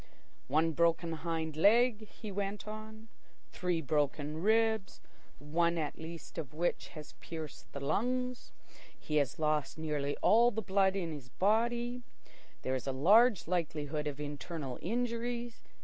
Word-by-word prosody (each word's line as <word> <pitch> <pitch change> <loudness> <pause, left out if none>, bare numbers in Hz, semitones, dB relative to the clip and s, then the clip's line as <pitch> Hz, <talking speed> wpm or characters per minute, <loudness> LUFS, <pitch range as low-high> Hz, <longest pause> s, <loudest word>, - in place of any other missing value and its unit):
"One 160 +4 +3
broken 170 +1 +2
hind 160 -1 -3
leg," 215 +5 +4
he 215 0 -8
went 200 +2 -3
on. 220 +1 -8 0.4
"Three 180 -3 -1
broken 150 +2 0
ribs, 220 0 +2 0.4
one 170 +3 +1
at 155 -3 -3
least 165 +1 -7
of 150 -2 -6
which 175 +2 -1
has 150 -1 -9
pierced 160 -3 -8
the 140 - -6
lungs. 250 - -1 0.5
He 150 - -1
has 140 -3 +1
lost 155 -1 0
nearly 150 -3 -2
all 235 +3 +6
the 220 -1 -3
blood 190 0 +3
in 175 -4 -2
his 140 -5 -8
body. 235 - +1 0.6
There 130 - -1
is 130 0 -3
a - - +1
large 205 - +5
likelihood 155 -3 -1
of 145 -1 -4
internal 145 -2 -5
injuries. 235 +3 -2
170 Hz, 140 wpm, -33 LUFS, 150-220 Hz, 0.6 s, all